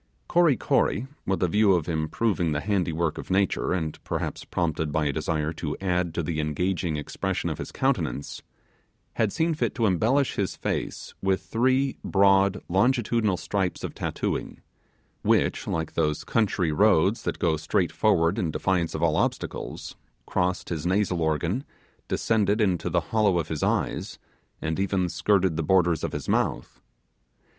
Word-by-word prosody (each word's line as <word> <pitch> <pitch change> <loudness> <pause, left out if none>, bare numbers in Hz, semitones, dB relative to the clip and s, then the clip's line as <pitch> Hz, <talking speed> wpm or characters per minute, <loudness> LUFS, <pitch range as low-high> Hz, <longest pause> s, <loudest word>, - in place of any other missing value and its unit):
Kory 170 -7 +4
Kory, 115 - +1 0.2
with 95 -1 0
a - - +4
view 105 +2 +4
of 85 -4 0
improving 85 +2 0
the 75 - 0
handiwork 85 -4 -1
of - - -8
nature, 95 0 +1
and 80 -4 -2
perhaps - - -3
prompted 80 -3 -1
by 75 +1 0
a 70 - 0
desire 75 +2 -1
to 75 -2 -4
add 90 -3 -1
to 85 - -1
the 80 0 -2
engaging 80 +2 -1
expression 75 - -2
of - - -5
his - - -6
countenance, 70 - -1 0.7
had 110 -3 +1
seen 160 +7 +1
fit 155 - -1
to 115 - +1
embellish 115 +9 +2
his 100 -2 -1
face - - -4
with 95 -1 +1
three 130 +3 +1
broad 100 0 +3
longitudinal 110 0 +2
stripes 95 -2 -2
of - - -4
tattooing, - - -3 0.6
which, - - +1
like 80 -1 -2
those 75 -2 0
country 95 -7 +1
roads 100 +4 +3
that - - -3
go 80 -3 +1
straight 80 +1 0
forward 85 +4 +2
in 85 - 0
defiance 85 +1 0
of 80 - -2
all 80 -2 +3
obstacles, - - -3 0.3
crossed 90 +1 -1
his 80 -4 -3
nasal 90 -1 +1
organ, 85 - 0 0.4
descended 105 -1 +1
into 90 -5 +1
the 85 0 +1
hollow 105 -5 +3
of 80 -2 -2
his 80 -2 -3
eyes, - - -1 0.5
and 80 +3 -1
even 95 -2 +1
skirted 95 -2 +1
the - - +1
borders 85 -1 +2
of - - -1
his - - -5
mouth. - - -1
90 Hz, 160 wpm, -26 LUFS, 80-100 Hz, 0.7 s, Kory